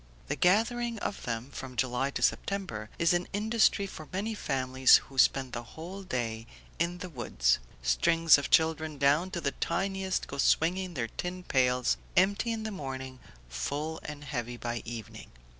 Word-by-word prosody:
The 150 - 0
gathering 230 +7 +2
of 205 - -4
them, 120 +3 -4
from 130 -2 -7
July 130 +2 0
to - - -3
September, 150 - -1
is 170 0 +3
an 175 0 0
industry 215 0 +2
for 155 -5 -9
many 205 +4 -2
families 130 -8 +4
who 135 -1 -7
spend 130 -1 +3
the 120 - -3 0.2
whole 180 +5 -7
day 115 -9 -3 0.3
in 170 +2 0
the 180 0 -7
woods; 60 - +1 0.2
strings 165 - +5
of 140 - -4
children 160 -1 +2
down 145 +6 +3
to 180 - -4
the 140 -4 -1
tiniest 190 +3 -1
go 140 - -7
swinging 180 +5 +2
their 115 -4 -2
tin 180 +6 -5
pails, 125 -4 +2 0.2
empty 200 +5 +3
in 225 -1 -3
the 220 - -3
morning, 130 -6 -6 0.3
full 145 - -3
and 150 -1 -7
heavy 120 -3 -4
by 120 0 -3
evening. 115 -2 -8
150 Hz, 165 wpm, -30 LUFS, 125-185 Hz, 0.3 s, strings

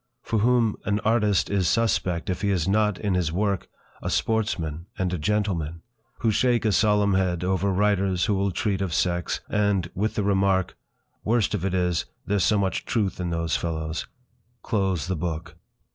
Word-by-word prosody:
For 110 - 0
whom 115 -1 +2
an 100 +1 0
artist 105 -4 +2
is 95 -3 +1
'suspect' 95 -6 +1
if 90 - -4
he 100 - +1
is 90 -4 +1
not, 105 0 +2
in 100 -3 -1
his 90 -3 0
work, 100 +1 -1 0.3
a - - -3
sportsman 85 -8 -1
and 90 -1 -1
a 90 - -2
gentleman? 85 -4 -1 0.4
Who 115 -3 +3
shake 120 +1 +2
a 110 - +3
solemn 105 -1 +3
head 90 -2 +1
over 95 +2 +1
writers 95 -2 +2
who 105 - +1
will 100 0 +1
treat 95 +1 -1
of 90 -5 -1
sex; 85 -2 0
and, 100 -4 0
with 105 +4 -1
the 105 - 0
remark: 95 -2 +1 0.5
"Worst 115 0 +1
of - - -2
it 95 -1 0
is, 90 -2 0 0.2
there's 100 -3 +1
so 105 - +3
much 95 -1 0
truth 105 -6 -1
in 90 -1 -2
those 85 -2 -1
fellows!" 80 -1 -3 0.6
close 95 -6 0
the 95 +1 -2
book. 85 0 -4
95 Hz, 180 wpm, -25 LUFS, 90-105 Hz, 0.6 s, Who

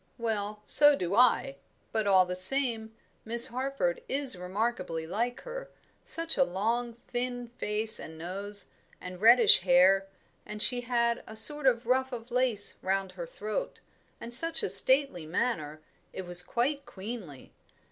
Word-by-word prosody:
"Well, 210 -3 -4
so 290 -1 +8
do 180 -6 -4
I; 250 +4 +2 0.3
but, 220 -2 -1
all 190 -2 +4
the 180 0 -5
same, 225 +2 +1 0.3
Miss 235 +1 +3
Harford 275 - -3
is 275 -5 0
remarkably 180 -3 -4
like 235 +8 -4
her - - -9 0.3
such 330 0 -1
a 270 - +4
long, 230 +4 -3
thin 245 -1 -4
face 220 -1 -2
and 160 0 -10
nose, 200 +4 -6 0.3
and 180 0 -10
reddish 230 -1 +6
hair; 185 +2 +3 0.4
and 210 - -9
she 245 +3 +5
had 235 -1 -1
a 220 - -11
sort 280 +5 +4
of 235 -2 +1
ruff 260 +2 0
of 240 -1 -9
lace 245 -5 0
round 190 0 -2
her 175 -2 -9
throat, 215 - -6 0.4
and 235 - -9
such 330 +7 +1
a - - +3
stately 260 - +4
manner, 155 -5 -3 0.3
it 190 - -7
was 175 0 -2
quite 275 +8 -3
queenly. 190 - -10
225 Hz, 150 wpm, -28 LUFS, 190-250 Hz, 0.4 s, so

